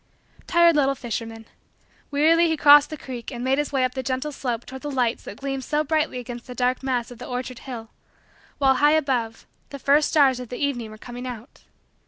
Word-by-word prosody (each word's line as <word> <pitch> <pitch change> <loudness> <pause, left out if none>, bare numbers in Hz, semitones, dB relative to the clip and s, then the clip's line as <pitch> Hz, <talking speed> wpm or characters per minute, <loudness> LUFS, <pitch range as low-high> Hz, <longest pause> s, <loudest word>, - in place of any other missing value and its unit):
Tired 340 -1 +5
little 275 -2 +2
fisherman. 225 -2 -6 0.6
Wearily 320 +4 +4
he 320 -1 0
crossed 290 0 +7
the 310 - -6
creek 250 -4 -7
and 240 -2 -6
made 265 +2 +1
his 295 - -2
way 270 -2 +1
up 255 - -3
the 265 - -3
gentle 260 +4 -2
slope 245 -4 -4
toward 265 0 -9
the 295 - -5
lights 250 -4 0
that 205 - -8
gleamed 270 -1 -4
so 300 +3 0
brightly 310 -3 0
against 245 0 -7
the 250 - -8
dark 250 0 0
mass 250 -3 -2
of 240 - -11
the - - -8
orchard 250 0 -5
hill, 235 -4 -8 0.7
while 265 -2 +3
high 295 +2 +5
above, 255 -7 -1 0.2
the 280 - -7
first 285 +3 +3
stars 275 -5 +4
of 250 -2 -8
the 245 - -5
evening 250 -6 -2
were 215 - -11
coming 245 +3 -8
out. 245 +1 -10
260 Hz, 215 wpm, -24 LUFS, 245-290 Hz, 0.7 s, crossed